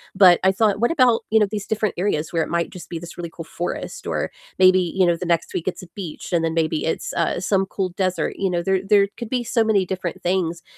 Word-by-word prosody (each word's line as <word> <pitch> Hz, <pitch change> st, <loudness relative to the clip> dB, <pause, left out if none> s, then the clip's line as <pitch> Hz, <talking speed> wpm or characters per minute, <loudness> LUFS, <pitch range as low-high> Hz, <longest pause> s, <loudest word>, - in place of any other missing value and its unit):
but 185 Hz, -3 st, +7 dB
I 190 Hz, -, +6 dB
thought, 205 Hz, 0 st, +2 dB
"What 240 Hz, +6 st, +2 dB
about, 255 Hz, -7 st, +4 dB
you 220 Hz, -, +4 dB
know, 210 Hz, -, +4 dB
these 210 Hz, -2 st, -4 dB
different 215 Hz, -2 st, 0 dB
areas 170 Hz, -4 st, -1 dB
where 165 Hz, -, +1 dB
it -, -, -1 dB
might 170 Hz, 0 st, 0 dB
just 180 Hz, -, -10 dB
be 170 Hz, -, -4 dB
this 170 Hz, +1 st, -10 dB
really 170 Hz, -1 st, -5 dB
cool 165 Hz, -, -8 dB
forest," 175 Hz, +2 st, -5 dB
or -, -, -2 dB, 0.3 s
maybe, 185 Hz, 0 st, +6 dB
you 185 Hz, +1 st, +1 dB
know, 175 Hz, -1 st, +3 dB
the 180 Hz, -, -5 dB
next 170 Hz, -1 st, 0 dB
week 165 Hz, -, -3 dB
it's 185 Hz, -, -3 dB
a -, -, -10 dB
beach, 180 Hz, -4 st, -7 dB
and 170 Hz, -1 st, +2 dB
then 165 Hz, 0 st, 0 dB
maybe 160 Hz, -1 st, 0 dB
it's, 160 Hz, -, -2 dB
uh, 170 Hz, +1 st, 0 dB
some 195 Hz, 0 st, +1 dB
cool 190 Hz, -1 st, -2 dB
desert, 185 Hz, 0 st, -2 dB
you 195 Hz, -, 0 dB
know, 175 Hz, -1 st, -1 dB
there 190 Hz, 0 st, +1 dB
there 200 Hz, 0 st, +4 dB
could 235 Hz, -, -6 dB
be 250 Hz, -1 st, -1 dB
so 230 Hz, 0 st, +1 dB
many 205 Hz, -4 st, +2 dB
different 180 Hz, -2 st, -4 dB
things 175 Hz, -2 st, -1 dB
185 Hz, 260 wpm, -22 LUFS, 170-200 Hz, 0.3 s, but